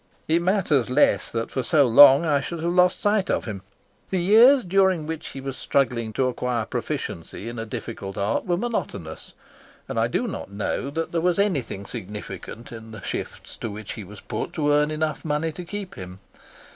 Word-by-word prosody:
It 165 +2 +3
matters 175 - +2
less 125 -6 +3
that 115 0 -3
for 130 - -1
so 145 +3 +4
long 140 +6 +8
I 145 -3 +2
should 165 +4 -5
have 170 +1 0
lost 180 0 +4
sight 205 -1 +2
of - - 0
him. 105 -4 -5 0.5
The 190 - 0
years 230 +8 +6
during 190 -3 +2
which 160 0 -5
he 135 - -7
was 135 -1 -5
struggling 120 -6 0
to 130 +3 +1
acquire 125 -2 -1
proficiency 90 +1 -5
in 120 0 -5
a 115 - -5
difficult 100 -3 -6
art 100 +3 0
were 175 -1 +1
monotonous, 140 - -4 0.5
and - - -2
I - - +3
do - - -1
not - - -6
know 105 +6 -3
that 165 +3 -3
there 165 - 0
was 175 0 +2
anything 145 - -1
significant 105 +2 -8
in 115 -1 -9
the 110 -2 -10
shifts - - -5
to 115 - -4
which 105 0 -7
he 110 - -7
was 100 +2 -12
put - - -4
to 145 -2 +1
earn 150 +1 +3
enough 155 0 -2
money 155 +1 -1
to 180 +4 -8
keep 200 +1 -6
him. 90 0 -9
140 Hz, 195 wpm, -24 LUFS, 115-175 Hz, 0.5 s, long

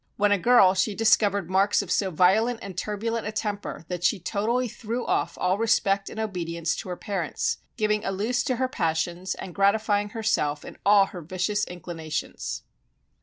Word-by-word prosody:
While 205 0 +3
a 205 - +3
girl 200 -3 +6
she 190 +2 0
discovered 205 -4 +3
marks 195 +3 +2
of 185 - -7
so 195 - +2
violent 200 +8 +3
and 195 -2 -7
turbulent 215 +4 -2
a - - -2
temper 205 -5 -4
that 180 -1 -5
she 195 +3 +2
totally 225 +7 0
threw 235 +2 -4
off - - -1
all 185 +2 +1
respect 200 -3 +2
and 220 - -7
obedience 170 -6 -2
to - - -6
her 180 - -3
parents, 185 -4 -2 0.2
giving 210 -1 +1
a - - -1
loose 220 +6 0
to 255 - 0
her 260 +2 0
passions 175 -2 -1
and 180 - -8
gratifying 205 +1 +2
herself 205 -10 -1
in - - -10
all 200 -1 +6
her 180 - -6
vicious 185 +5 -1
inclinations. 165 -3 -5
200 Hz, 175 wpm, -26 LUFS, 180-215 Hz, 0.2 s, girl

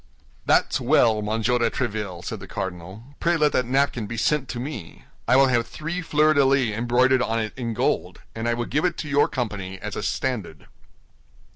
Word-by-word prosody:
"That's - - +3
well, 110 -2 +3
Monsieur 110 +3 0
de 115 -1 +2
Tréville," 105 -8 -4
said 110 - -4
the 100 - -10
cardinal; 95 +3 -6 0.2
"pray 170 0 +2
let 150 -2 +3
that 125 -2 0
napkin 130 -4 +1
be 115 - -5
sent 140 +3 0
to 120 - -4
me. 120 - -7 0.2
I 125 - +4
will 135 +1 +7
have 120 -3 +1
three 165 +4 -4
fleur 155 -2 +3
de 145 -2 +4
lis 130 -5 +2
embroidered 125 +3 +3
on 115 -2 0
it 110 -1 -3
in 115 -3 -4
gold, - - -1
and 115 +1 -2
will 120 - -2
give 150 +7 -1
it 180 -2 0
to 155 - -5
your 145 0 +3
company 100 -6 -4
as - - -6
a - - -3
standard." 110 - -3
120 Hz, 195 wpm, -24 LUFS, 110-135 Hz, 0.2 s, will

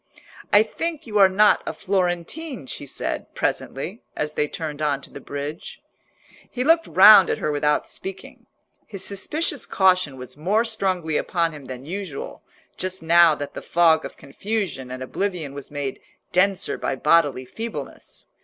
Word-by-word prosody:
"I 205 +1 +7
think 325 +7 -4
you 210 -3 -1
are 195 -1 +8
not 205 +3 +4
a - - -2
Florentine," 190 - -2
she 140 - -7
said, - - -4
presently, 180 - -3
as 150 0 -3
they 150 - 0
turned 155 -1 -5
on 145 -2 +1
to - - -11
the - - -9
bridge. 150 - -6 0.7
He 250 - -2
looked 330 +3 +4
round 195 0 +8
at - - 0
her 150 - -1
without 150 0 +1
speaking. 190 0 -9 0.4
His 195 -3 -6
suspicious 285 - -2
caution 185 -7 +2
was 125 0 -9
more 200 +9 +1
strongly 185 -8 -1
upon 170 -2 0
him 150 -3 -11
than 130 0 -8
usual, 180 -3 -6 0.4
just 185 -1 -4
now 170 -1 +6
that 145 -1 -6
the - - -6
fog 165 -2 +3
of - - -8
confusion 190 - -4
and 130 0 -6
oblivion 170 -1 -3
was 140 -1 -8
made 145 -2 -5 0.3
denser 190 +1 +1
by - - -1
bodily 145 -2 +2
feebleness. 225 - -7
175 Hz, 160 wpm, -23 LUFS, 145-200 Hz, 0.7 s, are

